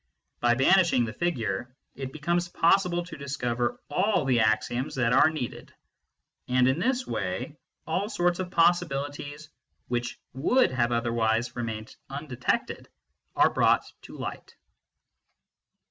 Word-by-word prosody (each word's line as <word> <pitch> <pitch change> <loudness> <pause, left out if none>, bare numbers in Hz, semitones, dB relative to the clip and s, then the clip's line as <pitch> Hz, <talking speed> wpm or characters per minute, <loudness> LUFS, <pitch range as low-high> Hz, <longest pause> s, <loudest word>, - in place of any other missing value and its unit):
By 120 0 +3
banishing 135 -2 +4
the 110 - -6
figure, 120 - -2 0.2
it 135 -1 -6
becomes 170 +4 -1
possible 175 0 +2
to 165 -3 -9
discover 125 -4 -2
all 185 0 +2
the 125 -3 +3
axioms 110 +4 0
that 125 -2 +2
are 155 - +6
needed; 155 -7 -6 0.8
and 125 0 +3
in 130 +5 +2
this 255 +5 0
way 95 - -3 0.3
all 185 +6 -1
sorts 175 -4 +1
of 185 -1 -3
possibilities, 150 -4 0 0.4
which 120 -1 -2
would 165 - +3
have 120 -2 +1
otherwise 115 -1 0
remained 110 -2 -5
undetected, 135 -3 -3 0.5
are - - +4
brought - - +3 0.2
to - - -11
light. - - -7
135 Hz, 125 wpm, -27 LUFS, 120-170 Hz, 0.8 s, are